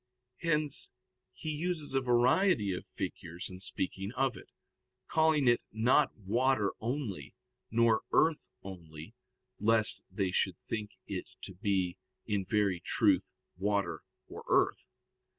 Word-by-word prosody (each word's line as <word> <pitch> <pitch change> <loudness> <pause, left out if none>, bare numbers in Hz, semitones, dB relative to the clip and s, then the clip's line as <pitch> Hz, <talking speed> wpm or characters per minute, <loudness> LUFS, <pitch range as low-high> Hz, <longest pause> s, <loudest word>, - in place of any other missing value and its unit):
Hence 155 -4 +1 0.4
he 155 - -5
uses 155 -1 -2
a 135 - +2
variety 125 - +3
of 90 - -6
figures 85 +2 -5
in 90 - -9
speaking 95 +1 -3
of 130 -2 +1
it, 95 - -12 0.6
calling 160 -4 +3
it 120 0 +5
not 125 +6 +3
water 110 +1 +1
only, 115 - -4 0.3
nor 115 -1 +4
earth 160 -1 +3
only, 85 -1 -9 0.5
lest 110 +1 +2
they 95 -3 -1
should - - +1
think 105 -2 -3
it - - -5
to 95 - -7
be 95 -2 0 0.3
in 100 -2 -1
very 100 -4 +2
truth - - +2 0.3
water 100 +1 0 0.3
or - - -9
earth. - - +2
110 Hz, 125 wpm, -32 LUFS, 95-135 Hz, 0.6 s, it